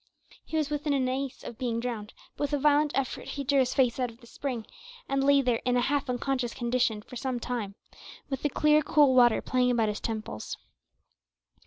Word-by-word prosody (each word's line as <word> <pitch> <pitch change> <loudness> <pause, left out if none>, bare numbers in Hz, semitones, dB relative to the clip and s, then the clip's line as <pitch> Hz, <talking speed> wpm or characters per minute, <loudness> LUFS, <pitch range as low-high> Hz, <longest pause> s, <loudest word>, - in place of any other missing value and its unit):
He 320 - -3
was 300 -2 0
within 295 0 0
an 265 -2 +1
ace 265 +1 -3
of 230 - -8
being 235 -2 -1
drowned, 230 -3 -5 0.2
but - - -26
with 290 - -5
a - - +3
violent 295 +1 +3
effort 270 -2 -2
he 280 - -4
drew 275 +1 +2
his 255 -1 +1
face 250 -2 +2
out 250 -1 0
of 230 +1 -15
the 245 - -16
spring, 240 -2 -5 0.4
and 275 0 0
lay 280 0 +5
there 245 -3 +1
in 250 0 +2
a - - +3
half 280 0 0
unconscious 250 -1 -1
condition 240 -3 0
for 250 - -12
some 255 0 -2
time, 230 -5 -4 0.5
with 270 -2 -4
the 295 - +1
clear 300 +2 +4
cool 295 -3 +4
water 240 -3 +5
playing 250 -1 +2
about 230 -3 +2
his 210 - -3
temples. 215 - -5
255 Hz, 210 wpm, -28 LUFS, 235-280 Hz, 0.5 s, lay